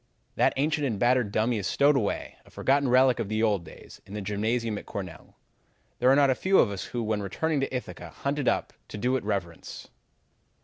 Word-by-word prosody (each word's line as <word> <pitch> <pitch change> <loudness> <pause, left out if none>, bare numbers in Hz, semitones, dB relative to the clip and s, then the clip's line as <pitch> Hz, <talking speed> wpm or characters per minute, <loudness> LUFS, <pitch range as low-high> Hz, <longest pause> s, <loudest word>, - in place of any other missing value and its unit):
"That - - +3
ancient 145 +1 +1
and 110 -5 -2
battered 120 -1 +2
dummy 110 +2 +1
is 95 - -3
stowed 145 +1 +3
away, 110 -7 -2
a - - -20
forgotten 140 0 +1
relic 130 -1 +4
of 110 -4 -3
the 110 +1 0
old 105 -5 +1
days, 80 - -14
in 100 - -10
the 105 - -4
gymnasium 110 +2 -1
at - - -15
Cornell. 90 -5 -8 0.6
There 125 - +4
are 135 - +6
not 140 -1 +4
a - - +4
few 190 +9 +2
of 105 - +4
us 100 - -5
who, 120 -1 -4
when 105 -1 -1
returning 150 - -1
to 135 - -2
Ithaca, 125 -1 -6
hunt 140 +1 -3
it 140 - -2
up - - 0
to - - -8
do 125 +5 0
it 130 - -2
reverence. 95 -5 -5
120 Hz, 220 wpm, -27 LUFS, 105-135 Hz, 0.6 s, are